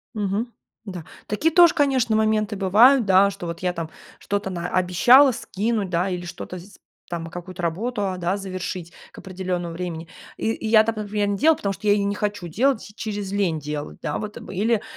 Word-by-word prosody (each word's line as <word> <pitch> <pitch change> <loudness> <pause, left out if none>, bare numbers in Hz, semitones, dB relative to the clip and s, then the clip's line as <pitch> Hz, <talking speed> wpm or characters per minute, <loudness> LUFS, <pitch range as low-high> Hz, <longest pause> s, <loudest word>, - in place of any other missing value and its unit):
Мгм, 210 +3 -2 0.3
да. 185 -5 -7 0.2
Такие 300 +10 0
тоже, 345 0 +7
конечно, 265 -7 +2
моменты 215 -1 +1
бывают, 220 +7 +5
да, 195 +1 +5
что 195 -2 -8
вот 170 0 -5
я 180 -1 0
там 165 -2 -5 0.3
что-то 200 -1 -2
наобещала 185 +9 +4
скинуть, 215 -2 -2
да, 180 +2 0
или 180 -1 -4
что-то 180 +1 -7
с 195 +3 -15 0.3
там, 170 -1 -4
какую-то 175 +2 -8
работу, 200 +6 -2
а, 185 -1 -3
да, 180 +2 -1
завершить 185 -3 -6 0.2
к - - -18
определённому 180 -2 -4
времени, 170 -1 -5 0.3
и 225 - 0
и 220 - -5
я 220 0 +6
там, 225 0 -2
например, 210 -1 -1
не 200 0 -1
делаю, 315 +6 +4
потому 200 -1 -2
что 210 - -6
я 205 0 +5
не 200 0 -1
хочу 205 -3 -3
делать, 220 - 0
через 205 -3 -4
лень 185 -6 0
делать. 150 0 -6
Да, - - -2
вот, 210 -1 -6
или 210 +3 -1
200 Hz, 190 wpm, -23 LUFS, 180-220 Hz, 0.3 s, тоже